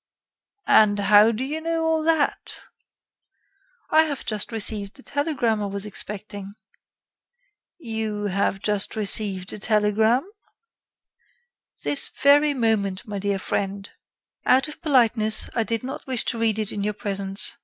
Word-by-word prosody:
"And 210 -1 +5
how 205 +2 +6
do 230 +3 -3
you 300 +4 -4
know 330 0 -1
all 320 0 +1
that?" 315 -2 0 1.3
"I 315 - +6
have 285 -3 -4
just 215 0 0
received 210 -2 -2
the 270 - -13
telegram 275 -7 -1
I 205 - -2
was 200 +1 -4
expecting." 205 -1 -6 1.2
"You 220 - -4
have 195 -1 -1
just 210 -1 0
received 200 -3 -2
a - - -7
telegram?" 220 - +2 1.6
"This 285 - -1
very 290 +1 +4
moment, 210 -6 0
my 205 -2 -5
dear 200 0 -1
friend. 195 +1 -3 0.5
Out 260 +3 +3
of 305 - -10
politeness, 230 -7 +2
I 230 - +1
did 230 +1 -2
not 265 +2 -7
wish 255 -3 -1
to 230 - -2
read 225 -2 +1
it 215 -2 -2
in 205 - -4
your 210 +1 -2
presence. 195 -1 0
215 Hz, 140 wpm, -24 LUFS, 205-260 Hz, 1.6 s, how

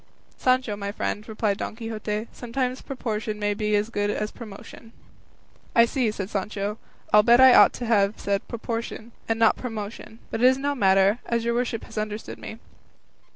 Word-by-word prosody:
"Sancho, 255 -4 +1
my 200 0 -4
friend," 210 +1 -4
replied 215 -2 0
Don - - -4
Quixote, 220 -2 -4
"sometimes 250 +1 -3
proportion 220 -5 -4
may 205 0 0
be 210 0 0
as 210 +2 0
good 205 -2 0
as 210 +1 -2
promotion." 225 +1 -11 0.8
"I 230 - +7
see," 245 -1 0
said 200 -3 -4
Sancho; 205 +1 -3 0.3
"I'll 210 - +8
bet 235 +3 +5
I 260 -1 +9
ought - - +8
to 245 - -5
have 210 -2 +2
said 200 -1 -1
proportion, 230 0 -5 0.2
and 225 - +1
not 225 -1 +4
promotion; 220 -2 -6
but 225 - -3
it 250 - +7
is 260 0 +4
no 285 +1 -1
matter, 195 -2 +3
as 235 -1 0
your 235 - +1
worship 240 -2 -1
has 220 - -6
understood 215 0 -5
me." 220 - -8
220 Hz, 180 wpm, -25 LUFS, 210-235 Hz, 0.8 s, I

